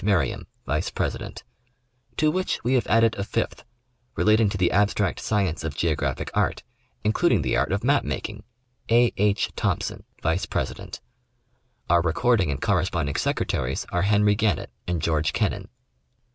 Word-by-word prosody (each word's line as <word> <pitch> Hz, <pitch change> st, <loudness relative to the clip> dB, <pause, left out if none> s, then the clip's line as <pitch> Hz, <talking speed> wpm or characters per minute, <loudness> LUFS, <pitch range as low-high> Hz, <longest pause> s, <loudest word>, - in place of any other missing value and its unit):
Merriam, 95 Hz, -, +1 dB, 0.2 s
vice -, -, -1 dB
president; -, -, -4 dB, 0.7 s
to 155 Hz, 0 st, +3 dB
which 185 Hz, +3 st, -1 dB
we 125 Hz, +3 st, +1 dB
have 125 Hz, -, +2 dB
added 115 Hz, 0 st, +4 dB
a -, -, 0 dB
fifth, -, -, -2 dB, 0.5 s
relating 110 Hz, 0 st, +4 dB
to 100 Hz, -, -3 dB
the 90 Hz, -1 st, +2 dB
abstract 100 Hz, -1 st, +1 dB
science 95 Hz, -6 st, 0 dB
of 80 Hz, -3 st, -4 dB
geographic 80 Hz, -1 st, -1 dB
art, -, -, 0 dB, 0.4 s
including 105 Hz, 0 st, +2 dB
the -, -, 0 dB
art 65 Hz, +7 st, +1 dB
of 100 Hz, +2 st, -1 dB
map 140 Hz, +3 st, +3 dB
making 105 Hz, -1 st, -4 dB, 0.5 s
etc., 115 Hz, -, +5 dB
A. 120 Hz, -1 st, +4 dB
H. 105 Hz, 0 st, +2 dB
Thompson, -, -, -2 dB, 0.2 s
vice 80 Hz, +4 st, 0 dB
president; -, -, -4 dB, 0.9 s
our 85 Hz, 0 st, +4 dB
recording 95 Hz, +3 st, +2 dB
and 70 Hz, -, -2 dB
corresponding 80 Hz, -5 st, 0 dB
secretaries 65 Hz, +2 st, -1 dB
are 90 Hz, -, +1 dB
Henry 105 Hz, +1 st, +4 dB
Gannett 105 Hz, -1 st, 0 dB, 0.2 s
and 85 Hz, -3 st, -1 dB
George 80 Hz, -2 st, +1 dB
Kennan. -, -, -1 dB
100 Hz, 150 wpm, -25 LUFS, 85-110 Hz, 0.9 s, etc